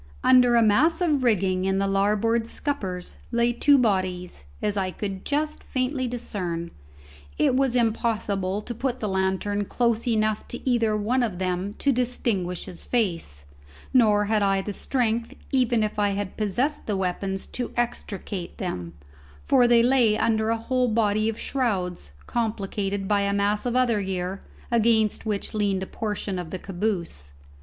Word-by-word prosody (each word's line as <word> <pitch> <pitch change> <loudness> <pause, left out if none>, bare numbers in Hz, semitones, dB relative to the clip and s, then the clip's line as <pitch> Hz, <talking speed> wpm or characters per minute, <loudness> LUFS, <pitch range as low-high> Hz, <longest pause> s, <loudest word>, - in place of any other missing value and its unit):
Under 250 -2 +6
a 235 - +5
mass 270 - +3
of 310 -6 +2
rigging 190 -5 +2
in 190 0 +1
the 195 - +1
larboard 210 +4 +1
scuppers 195 - -4 0.2
lay 235 0 +2
two 285 +4 +5
bodies, 185 - -1
as 205 - -1
I 190 -2 0
could 195 0 -5
just 300 +1 -1
faintly 255 0 -1
discern; 180 -8 -4 0.7
it - - +3
was 265 -2 +2
impossible 215 -4 0
to 240 - -5
put 250 +2 -2
the 215 - -2
lantern 190 +1 0
close 235 +1 0
enough 215 -2 +1
to 240 - -6
either 230 -4 +2
one 235 +5 +1
of 215 -7 -1
them 185 +2 -2
to 280 - +2
distinguish 230 -8 -1
his 175 - -9
face, 165 - -1 0.5
nor 210 -5 +4
had 215 0 +1
I 195 -1 +2
the 205 - -4
strength 230 +1 -1 0.2
even 245 -4 +2
if 210 0 -2
I 205 -1 +3
had 200 -2 -4
possessed 240 +8 -1
the 205 -3 0
weapons 190 +1 -2
to 245 - -3
extricate 205 -6 -3
them, 90 - -4 0.5
for 250 -3 +4
they 235 -1 +5
lay 240 -4 +4
under 220 0 +1
a 230 - +1
whole 250 +2 0
body 215 -1 +2
of 225 - -4
shrouds, 185 - -2
complicated 200 -3 -2
by 205 0 +2
a 200 0 0
mass 205 +3 +1
of 245 - -1
other 240 -5 +2
gear, 190 0 -3 0.3
against 225 -2 +2
which 210 0 -2
leaned 200 -3 0
a - - -3
portion 205 -2 -3
of 175 -2 -6
the 185 - -4
caboose. 175 - -3
215 Hz, 165 wpm, -25 LUFS, 195-240 Hz, 0.7 s, Under